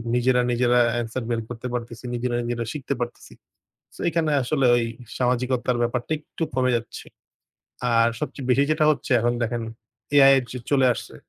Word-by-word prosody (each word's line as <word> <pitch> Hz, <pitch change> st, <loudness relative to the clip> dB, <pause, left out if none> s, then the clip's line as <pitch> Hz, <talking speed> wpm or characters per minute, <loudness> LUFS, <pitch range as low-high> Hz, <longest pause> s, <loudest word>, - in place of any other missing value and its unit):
নিজেরা, 125 Hz, +1 st, +3 dB
নিজেরা 120 Hz, 0 st, +3 dB, 0.2 s
answer 120 Hz, +2 st, -4 dB
বের 115 Hz, -1 st, 0 dB
করতে 120 Hz, +1 st, -6 dB
পারতেছি। 120 Hz, 0 st, -5 dB
নিজেরা, 120 Hz, 0 st, -2 dB
নিজেরা 120 Hz, -1 st, -2 dB
শিখতে 140 Hz, -2 st, -3 dB
পারতেছি। 120 Hz, 0 st, -6 dB, 0.6 s
সো -, -, -17 dB
এখানে 160 Hz, -2 st, 0 dB
আসলে 135 Hz, +1 st, +1 dB
ওই 120 Hz, -1 st, +1 dB, 0.3 s
সামাজিকতার 125 Hz, 0 st, 0 dB
ব্যাপারটা 120 Hz, +3 st, -2 dB
একটু 150 Hz, +2 st, -6 dB
কমে 130 Hz, -1 st, +2 dB
যাচ্ছে। 115 Hz, -1 st, -5 dB, 0.9 s
আর 115 Hz, 0 st, +4 dB
সবচেয়ে 140 Hz, -3 st, -5 dB
বেশি 135 Hz, +2 st, +4 dB
যেটা 155 Hz, 0 st, +2 dB
হচ্ছে 145 Hz, -, -5 dB
এখন 120 Hz, +1 st, +1 dB
দেখেন 120 Hz, 0 st, -2 dB, 0.5 s
AI-এর 135 Hz, -2 st, +7 dB
যুগ 125 Hz, -2 st, -7 dB
চলে 135 Hz, -2 st, +4 dB
আসছে। -, -, -9 dB
125 Hz, 160 wpm, -24 LUFS, 120-135 Hz, 0.9 s, AI-এর